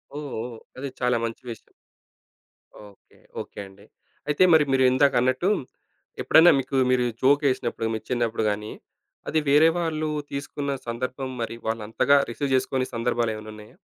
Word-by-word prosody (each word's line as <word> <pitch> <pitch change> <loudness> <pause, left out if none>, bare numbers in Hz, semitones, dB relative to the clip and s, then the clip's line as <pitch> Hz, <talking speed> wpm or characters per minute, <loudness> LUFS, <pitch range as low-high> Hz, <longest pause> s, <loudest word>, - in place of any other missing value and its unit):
ఓహ్! 150 0 -5 0.2
ఓహ్! 120 -2 -8 0.2
అది 135 +1 -5
చాలా 125 -1 +1
మంచి 115 - -6
విషయం. 115 - -11 1.1
ఓకే. 100 -1 -18 0.2
ఓకే - - -11
అండి. 100 +2 -18 0.4
అయితే 150 +5 +3
మరి 155 -2 +6
మీరిందాకన్నట్టు, 130 +4 +3 0.7
ఎప్పుడన్నా 165 +2 +6
మీకు 135 +1 -3
మీరు 125 -1 +2 0.2
జోకేసినప్పుడు 130 -4 +1
మీ 110 - -2
చిన్నప్పుడు 115 -3 -1
గాని, 105 +1 -4 0.6
అది 160 - +2
వేరే 155 +3 +6
వాళ్ళు 155 -2 -2 0.2
తీసుకున్న 140 0 -4 0.2
సందర్భం 130 +3 -4
మరి 115 0 -4
వాళ్ళంతగా 115 +5 +2
రిసీవ్ 140 +2 -3
జేసుకోని 130 0 0
సందర్భాలు 115 -1 0
ఏమన్నా 110 0 -9
ఉన్నాయా? 105 0 -14
130 Hz, 135 wpm, -24 LUFS, 115-140 Hz, 1.1 s, మరి